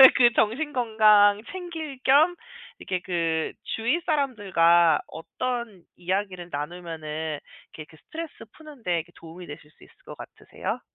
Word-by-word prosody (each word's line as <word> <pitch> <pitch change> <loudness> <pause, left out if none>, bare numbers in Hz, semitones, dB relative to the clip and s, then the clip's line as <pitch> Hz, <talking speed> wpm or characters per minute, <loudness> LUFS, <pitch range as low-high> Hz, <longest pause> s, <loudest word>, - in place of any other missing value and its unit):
그 240 -1 +6
정신 290 +8 +1
건강 215 -4 +5
챙길 325 -7 -6
겸 310 +6 +5 0.4
이렇게 185 -1 -3
그 165 -3 -1 0.2
주위 230 +9 +1
사람들과 185 - +3
어떤 235 +2 -5
이야기를 185 -1 -3
나누면은 155 0 -5 0.3
이게 155 - -9
그 160 - -17
스트레스 325 0 -7 0.2
푸는 300 -6 -14
데 170 -4 0
그 175 - -22
도움이 165 +2 -11
되실 150 0 -10
수 - - -21
있을 - - -20
것 - - -10
같으세요? - - -6
200 Hz, 285 characters per minute, -25 LUFS, 165-255 Hz, 0.4 s, 그